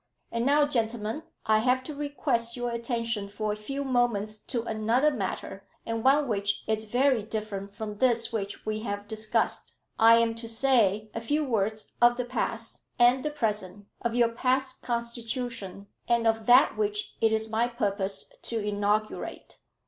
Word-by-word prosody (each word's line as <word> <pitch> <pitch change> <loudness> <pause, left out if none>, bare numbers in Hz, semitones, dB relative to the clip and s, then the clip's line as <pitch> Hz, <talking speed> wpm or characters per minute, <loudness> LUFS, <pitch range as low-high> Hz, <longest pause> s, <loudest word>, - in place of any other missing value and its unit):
"And 230 +2 0
now, 290 +1 +5
gentlemen, 230 -1 -1 0.2
I 215 0 +4
have 255 +3 +2
to 305 - -6
request 280 -5 -1
your 245 0 -2
attention 230 -3 -2
for 210 +1 -2
a - - -4
few 275 +7 -4
moments 235 -5 0
to 235 0 -3
another 230 +6 +2
matter, 200 -4 -4 0.2
and 230 -1 -2
one 280 +2 +4
which 200 -3 -1
is 220 0 0
very 250 +2 +2
different 205 -2 -5
from 210 -1 -6
this 235 -2 +2
which 205 -2 -4
we 215 0 -1
have 205 -2 -4
discussed. 215 0 -1 0.2
I 225 +1 +8
am 230 0 +2
to 230 - -6
say 225 -4 +2
a 225 - -4
few 295 +6 0
words 215 -3 -1
of 240 0 +6
the 250 - -1
past 230 -2 -3 0.2
and 245 +1 +5
the 300 - 0
present, 210 -8 -2 0.2
of 235 -1 -1
your 240 -1 +4
past 260 +2 0
constitution, 235 -4 -3 0.2
and 235 -1 +2
of 225 -1 +1
that 250 +4 +6
which 420 0 -1
it 225 -1 +4
is 220 0 0
my 225 +2 +2
purpose 200 -5 -2
to 230 - -3
inaugurate." 210 0 -2
230 Hz, 165 wpm, -28 LUFS, 215-245 Hz, 0.2 s, I